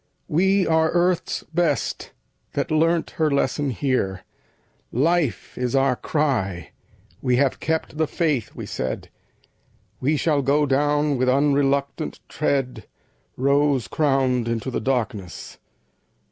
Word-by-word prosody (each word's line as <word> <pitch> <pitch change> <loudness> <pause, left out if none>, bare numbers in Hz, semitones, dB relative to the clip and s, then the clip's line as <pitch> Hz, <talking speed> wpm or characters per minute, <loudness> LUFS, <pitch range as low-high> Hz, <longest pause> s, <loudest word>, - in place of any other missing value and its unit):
"We 190 +4 +3
are 160 0 +3
Earth's 175 0 +1
best, 165 -4 0 0.4
that - - -2
learnt 165 +2 +2
her 155 - +4
lesson 140 0 0
here. 125 -8 -1 0.7
Life 150 - 0
is 125 0 -1
our 135 -1 +3
cry. 110 - -1 0.5
We 125 -2 +2
have 135 +1 +1
kept 160 -1 -2
the 160 - +2
faith!" 150 - -1
we - - -6
said; 65 - -4 0.9
"We 150 +4 +1
shall 150 -1 +1
go 145 +3 +2
down 145 +1 +1
with 130 0 +2
unreluctant 140 +2 +1
tread 135 -4 -1 0.5
Rose 140 -3 +2
crowned 130 -3 +1
into 115 +2 -2
the 120 - -2
darkness!" 110 -7 -3
140 Hz, 120 wpm, -23 LUFS, 125-155 Hz, 0.9 s, her